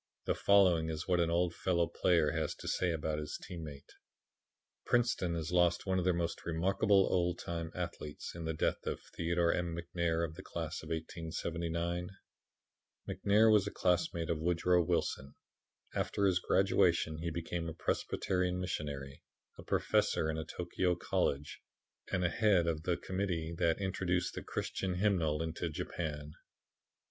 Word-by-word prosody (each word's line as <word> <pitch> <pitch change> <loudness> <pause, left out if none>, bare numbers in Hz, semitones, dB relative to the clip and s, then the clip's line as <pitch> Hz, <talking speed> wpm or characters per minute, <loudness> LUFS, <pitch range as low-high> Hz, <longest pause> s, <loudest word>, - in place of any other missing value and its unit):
The - - +2
following 90 -5 +4
is 80 0 -4
what 90 -2 +3
an 85 -1 +2
old 85 +1 +1
fellow 85 -2 +1
player 85 -2 +2
has 80 -2 -1
to - - -9
say 90 -2 +1
about 80 -1 -2
his 75 - -4
team 85 -2 -8
mate: 70 -3 -10 0.9
"Princeton 120 -8 +1
has 80 0 -3
lost 90 -1 +3
one 95 -1 +1
of 90 - -1
her 90 - +4
most 85 0 -2
remarkable 95 +4 +3
old 90 -1 +1
time 85 -1 -4
athletes 85 -4 -5
in 85 - -6
the 80 -1 -2
death - - -1
of - - -2 0.2
Theodore 85 0 +2
M. 85 -2 -2
McNair 85 -1 0
of 80 - -7
the 90 - -9
class 85 -4 -5
of - - -10
1879. 85 +1 -3 1.0
"McNair 110 +2 +4
was 100 -2 +4
a - - -3
classmate 85 -2 +1
of 80 - -1
Woodrow 90 +1 +3
Wilson. 80 -5 -1 0.6
After 100 - 0
his 90 -2 +3
graduation 85 -4 +2
he 85 +1 -2
became 85 0 -3
a - - -6
Presbyterian 90 +2 -1
missionary, 70 -6 -4 0.4
a - - -8
professor 80 - +1
in 80 - -3
a 80 - -4
Tokio 90 +2 -1
college 75 -4 -1 0.5
and 90 - +1
the 90 - +3
head 100 -4 +3
of 80 -2 -1
the 85 +2 0
Committee 90 -4 -2
that 80 -1 +3
introduced 90 -2 0
the - - -5
Christian 95 -2 -3
hymnal 85 -6 +1
into 80 +1 -3
Japan. 75 -1 -4
85 Hz, 160 wpm, -33 LUFS, 80-90 Hz, 1.0 s, following